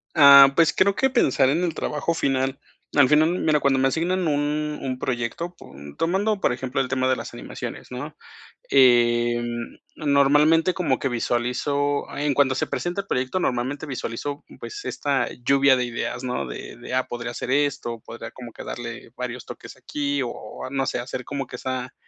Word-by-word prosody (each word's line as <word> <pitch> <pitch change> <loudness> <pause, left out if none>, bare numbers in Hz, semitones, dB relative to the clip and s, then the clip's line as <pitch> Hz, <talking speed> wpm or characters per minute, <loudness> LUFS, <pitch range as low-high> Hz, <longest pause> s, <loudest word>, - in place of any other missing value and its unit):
Ah, 140 -1 +9
pues 165 -2 +5
creo 200 +1 +4
que 265 +5 +2
pensar 160 - +3
en 165 +5 +1
el 170 -3 0
trabajo 150 +3 -2
final. 135 -3 0 0.3
Al 145 -3 +6
final, 150 +3 +4
mira, 150 -2 +2
cuando 135 -1 +3
me 135 - +3
asignan 175 +5 0
un 150 0 -1
un 130 -1 -3
proyecto 130 +8 -3
po - - -15 0.2
tomando, 195 +5 0
por - - +2
ejemplo 130 +2 -2
el 130 - -3
tema 130 0 +1
de 130 - +3
las - - -7
animaciones, - - -7
¿no?, - - -6 0.6
em, 120 -2 +3 0.2
normalmente 150 +4 +4
como 150 -8 0
que - - -1
visualizo 125 +4 0
en 145 0 +1
cuanto 135 -1 +3
se - - -1
presenta 175 +3 -3
el 200 - -22
proyecto, 130 +6 -1
normalmente 130 +1 -1
visualizo, 140 +1 -5 0.2
pues, 410 -1 -7
esta 140 -2 -1 0.2
lluvia 140 0 +5
de 125 - 0
ideas, 120 +1 -4
¿no? 125 - -2
De - - -8
de: - - -8
"Ah, 130 0 +1
podría 120 0 -5
hacer 120 - -6
esto, 140 -5 0
podría 115 - -9
como 120 -2 -10
que - - -9
darle 115 -1 -7
varios 125 -1 -5
toques - - -10
aquí". 145 -1 -2
O 120 - -3
o, 110 - -8
no 135 0 -1
sé, 125 - -1
hacer 125 +1 -5
como 140 -2 -4
que - - -8
esa 130 0 -4
135 Hz, 185 wpm, -24 LUFS, 125-150 Hz, 0.6 s, Ah